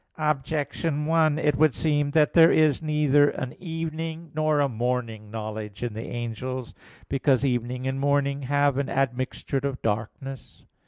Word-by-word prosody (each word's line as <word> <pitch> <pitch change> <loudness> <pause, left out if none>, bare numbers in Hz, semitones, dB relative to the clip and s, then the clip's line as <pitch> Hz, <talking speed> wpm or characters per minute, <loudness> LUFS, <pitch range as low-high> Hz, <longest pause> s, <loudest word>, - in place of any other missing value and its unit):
Objection 150 0 -1
1: 160 -1 +3
It 150 -3 +1
would 155 -2 +4
seem 145 -2 +1
that 150 0 +3
there 165 -1 +7
is 155 -3 +3
neither 150 -2 +3
an 130 -1 -5
evening 165 -1 -5
nor 155 -1 +1
a 145 - +3
morning 115 -3 -3
knowledge 110 -1 -6
in 120 -3 -3
the 110 +2 -6
angels; 120 +2 -5 0.3
because 135 0 +2
evening 125 0 -1
and 130 0 -2
morning 140 0 +1
have 145 0 +1
an 140 - -2
admixture 130 +1 -1
of 135 -1 -3
darkness. 115 +5 -4
140 Hz, 150 wpm, -25 LUFS, 125-150 Hz, 0.3 s, there